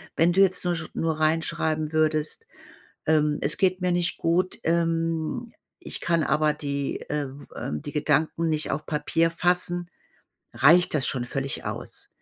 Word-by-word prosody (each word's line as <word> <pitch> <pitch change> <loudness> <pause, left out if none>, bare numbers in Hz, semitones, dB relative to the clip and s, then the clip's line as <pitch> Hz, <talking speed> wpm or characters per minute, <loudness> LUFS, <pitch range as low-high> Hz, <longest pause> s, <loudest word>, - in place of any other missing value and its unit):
Wenn 170 +2 +4
du 195 - +4
jetzt 190 -1 +2
nur 175 -1 +1
sch 160 -1 -5
nur 160 -1 -1
reinschreiben 155 -1 +1
würdest: 155 - 0 0.6
„Ähm, 150 -1 +3
es 145 - -1
geht 185 -1 +2
mir 180 -1 +2
nicht 175 -1 0
gut. 180 +3 +1
Ähm, 165 +6 0 0.3
ich - - -7
kann 170 -2 +1
aber 150 +1 +2
die 140 -1 -3
äh, 150 -1 -1 0.3
ähm, 75 0 -4
die 145 - -7
Gedanken 160 +2 +1
nicht 155 -1 -1
auf 150 +2 -3
Papier 160 +2 +1
fassen“, 175 0 0 0.6
reicht 170 +4 +5
das 145 -4 +1
schon 125 -2 -1
völlig 135 +2 -3
aus. - - -7
160 Hz, 155 wpm, -25 LUFS, 150-175 Hz, 0.6 s, reicht